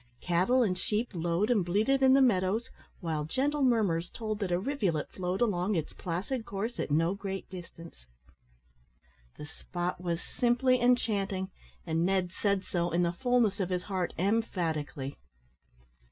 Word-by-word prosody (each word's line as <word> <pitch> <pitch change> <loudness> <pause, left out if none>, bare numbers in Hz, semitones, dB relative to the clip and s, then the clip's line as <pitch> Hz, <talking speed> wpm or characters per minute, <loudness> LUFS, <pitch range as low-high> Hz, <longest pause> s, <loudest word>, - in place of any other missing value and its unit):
Cattle 185 +9 +3
and 190 -5 +1
sheep 215 +5 -1
lowed 175 +5 0
and 210 -6 +3
bleated 215 +10 +2
in 260 -1 +6
the 270 0 +6
meadows, 210 0 +1 0.3
while 160 -4 -1
gentle 280 - 0
murmurs 205 -10 +2
told 215 -2 -4
that 195 -4 -2
a 175 - +3
rivulet 190 - -1
flowed 185 +2 -3
along 205 -3 +1
its 160 -3 -2
placid 190 +9 -3
course 220 +4 -4
at - - -2
no 165 +5 +2
great 195 -1 -5
distance. 170 - -11 1.3
The - - -7
spot 175 +3 -4
was 170 -2 -1
simply 250 +3 +2
enchanting 205 -6 +1 0.3
and 165 -1 0
Ned 185 -1 +1
said 200 0 0
so, 175 -2 -1
in 175 +1 +1
the 170 0 +1
fulness 240 -2 +2
of 190 -2 -1
his 180 -1 -1
heart, 185 -3 -2
emphatically. 165 -9 -1
190 Hz, 155 wpm, -30 LUFS, 175-230 Hz, 1.3 s, in